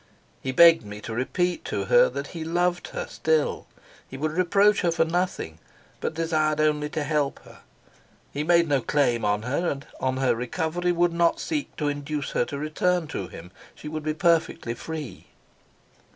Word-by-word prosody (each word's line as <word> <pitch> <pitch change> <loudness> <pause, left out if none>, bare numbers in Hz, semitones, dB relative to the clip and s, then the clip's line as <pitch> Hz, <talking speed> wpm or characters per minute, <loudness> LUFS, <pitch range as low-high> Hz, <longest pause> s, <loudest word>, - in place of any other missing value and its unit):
He 130 - -2
begged 165 +1 +7
me 105 0 -8
to 115 - -6
repeat 175 +9 -1
to - - -2
her - - +5
that - - -5
he 165 -2 -5
loved 175 +2 0
her - - -5
still; 160 -1 0 0.4
he 130 - -8
would 155 +3 -1
reproach 195 +5 +3
her 175 - +2
for 165 0 +2
nothing, 165 - -2 0.4
but - - -3
desired 155 -2 +1
only 150 -1 +1
to 155 0 -2
help 145 -2 0
her; - - -15 0.7
he 145 - -2
made 170 +1 +4
no 140 -3 +2
claim 120 -4 +1
on 105 0 +1
her, 145 +8 0
and 140 0 -4
on 130 0 -1
her 130 -1 +2
recovery 160 +8 -1
would 175 0 +2
not 170 0 +2
seek 300 -3 -3
to 150 - -2
induce 145 0 -3
her - - +1
to 140 - -6
return 160 +4 0
to 95 - -4
him; 90 +1 -11 0.2
she - - -10
would 155 +1 -4
be 155 0 -2
perfectly 165 -8 +1
free. 145 - -7
155 Hz, 180 wpm, -25 LUFS, 135-170 Hz, 0.7 s, begged